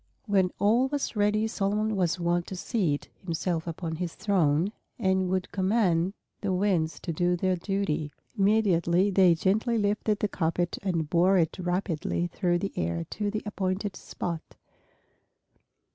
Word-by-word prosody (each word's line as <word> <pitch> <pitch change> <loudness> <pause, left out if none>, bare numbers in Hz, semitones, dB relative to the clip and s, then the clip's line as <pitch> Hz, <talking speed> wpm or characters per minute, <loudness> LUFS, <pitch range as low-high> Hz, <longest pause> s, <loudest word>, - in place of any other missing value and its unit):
When 195 -4 +3
all 230 +6 +3
was 285 -3 -2
ready 210 +1 +2
Solomon 215 0 0
was 180 -2 +1
wont 175 0 0
to 190 - -5
seat 180 -7 -1
himself 170 -1 -2
upon 165 -1 -4
his 175 -1 -4
throne, 180 -3 +2 0.3
and 190 -3 +1
would 185 0 -1
command 190 -3 +2 0.3
the 200 - -1
winds 180 -4 +1
to 170 - -3
do 175 +2 +1
their 185 +1 +1
duty. 180 -5 -2 0.2
Immediately 195 -3 +3
they 185 -3 +5
gently 215 +7 +1
lifted 210 0 +1
the 210 - 0
carpet 175 +3 -1
and 170 -6 -1
bore 180 +4 +4
it 165 +1 +1
rapidly 175 -2 -1
through 175 0 0
the 195 +3 -3
air 85 0 -1
to 210 -1 -2
the 215 +1 -3
appointed 195 0 -2
spot. 170 -2 -6
185 Hz, 145 wpm, -28 LUFS, 170-205 Hz, 0.3 s, they